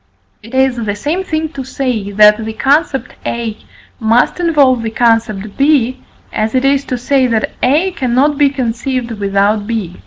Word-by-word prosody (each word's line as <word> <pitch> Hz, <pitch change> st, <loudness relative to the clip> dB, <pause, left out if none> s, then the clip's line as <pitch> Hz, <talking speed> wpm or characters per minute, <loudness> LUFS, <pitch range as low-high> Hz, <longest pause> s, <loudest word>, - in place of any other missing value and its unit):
It 230 Hz, +4 st, -10 dB
is 265 Hz, -1 st, +2 dB
the 205 Hz, -1 st, -2 dB
same 300 Hz, -, -2 dB
thing 315 Hz, -3 st, -2 dB
to 275 Hz, -3 st, -7 dB
say, 250 Hz, -6 st, -3 dB
that 210 Hz, +2 st, +5 dB
the 220 Hz, 0 st, -5 dB
concept 270 Hz, +3 st, 0 dB
A 230 Hz, -2 st, -3 dB, 0.4 s
must 230 Hz, +8 st, +2 dB
involve 285 Hz, -8 st, +3 dB
the 225 Hz, -, -3 dB
concept 220 Hz, -3 st, 0 dB
B, 270 Hz, -3 st, +2 dB, 0.3 s
as 220 Hz, +2 st, -1 dB
it 255 Hz, +1 st, +2 dB
is 275 Hz, 0 st, +2 dB
to 250 Hz, -, -3 dB
say, 260 Hz, +1 st, +1 dB
that 225 Hz, -2 st, -1 dB
A 310 Hz, +9 st, +2 dB
cannot 265 Hz, 0 st, +1 dB
be 285 Hz, 0 st, +3 dB
conceived 250 Hz, -1 st, -3 dB
without 205 Hz, 0 st, 0 dB
B. 210 Hz, -7 st, -4 dB
245 Hz, 165 wpm, -14 LUFS, 220-275 Hz, 0.4 s, that